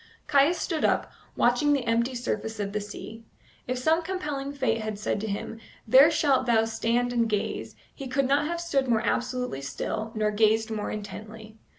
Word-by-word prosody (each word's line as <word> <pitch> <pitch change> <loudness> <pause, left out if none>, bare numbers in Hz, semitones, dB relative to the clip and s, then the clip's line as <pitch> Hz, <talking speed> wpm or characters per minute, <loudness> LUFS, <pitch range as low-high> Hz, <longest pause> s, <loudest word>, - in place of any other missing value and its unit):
Caius 295 +4 +4
stood 325 -1 -2
up, - - +1 0.2
watching 250 +5 +3
the 270 -4 0
empty 235 +2 +1
surface 225 -2 -3
of 200 -1 -3
the 210 - -1
sea. 220 +2 -9 0.4
If 255 0 -1
some 315 +6 +2
compelling 300 -6 -4
fate 255 -6 0
had 215 -1 -4
said 205 -1 -2
to 220 - -3
him, 215 +2 -4 0.3
"There 265 +7 +8
shalt 280 -5 +2
thou 225 -2 +4
stand 230 +2 0
and 230 -2 +1
gaze," 210 -2 -2 0.2
he 275 - -7
could 260 +1 +1
not 280 +2 +2
have 340 +1 -2
stood 285 -6 0
more 225 -2 +2
absolutely 250 - -2
still, 140 +10 -4
nor 215 -1 +1
gazed 220 +1 +2
more 210 -1 -3
intently. 215 +1 -8
235 Hz, 185 wpm, -27 LUFS, 220-275 Hz, 0.4 s, There